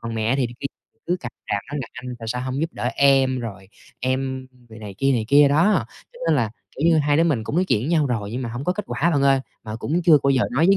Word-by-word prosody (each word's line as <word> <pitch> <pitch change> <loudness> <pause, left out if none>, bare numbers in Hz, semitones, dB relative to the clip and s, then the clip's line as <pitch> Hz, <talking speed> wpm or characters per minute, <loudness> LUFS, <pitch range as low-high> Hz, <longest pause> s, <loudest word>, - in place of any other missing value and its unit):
Còn 115 0 -5
mẹ 115 +4 +1
thì 130 - +1
khi 140 - -2 0.4
cứ 180 - +1
càm 120 -2 -7 0.2
ràm 100 - +2
nói 150 - -3
là 115 - -8
anh 125 0 -7
tại 115 -1 -7
sao 125 +2 -2
hông 130 +2 -3
giúp 165 +1 -2
đỡ - - -6
em, 135 -2 +4
rồi 100 -5 -7 0.3
em 130 +1 -2 0.2
rồi 110 0 -12
này 105 -2 -8
kia 135 0 +3
này 115 -3 0
kia 145 0 +6
đó. 160 - +3 0.3
Cho - - -15
nên 160 -2 +3
là, 115 -5 0 0.3
kiểu 150 +5 +1
như, 160 -2 +4
hai 145 0 +2
đứa 165 - +4
mình 135 -10 0
cũng 150 - -3
nói 185 - +3
chuyện 110 - +1
với 130 - -3
nhau 160 -4 +2
rồi 105 -5 -2
nhưng 130 +2 -3
mà 120 - -3
hông 120 +4 -5
có 180 - +1
kết 210 +1 -5
quả 170 +5 0
bạn 140 -3 +1
ơi. 135 -1 +4 0.2
Mà 110 0 -5
cũng 160 +9 -1
chưa 160 -3 +6
bao 140 - +3
giờ 130 -2 +3
nói 160 +5 +3
với 195 - +5
135 Hz, 295 wpm, -22 LUFS, 120-150 Hz, 0.4 s, kia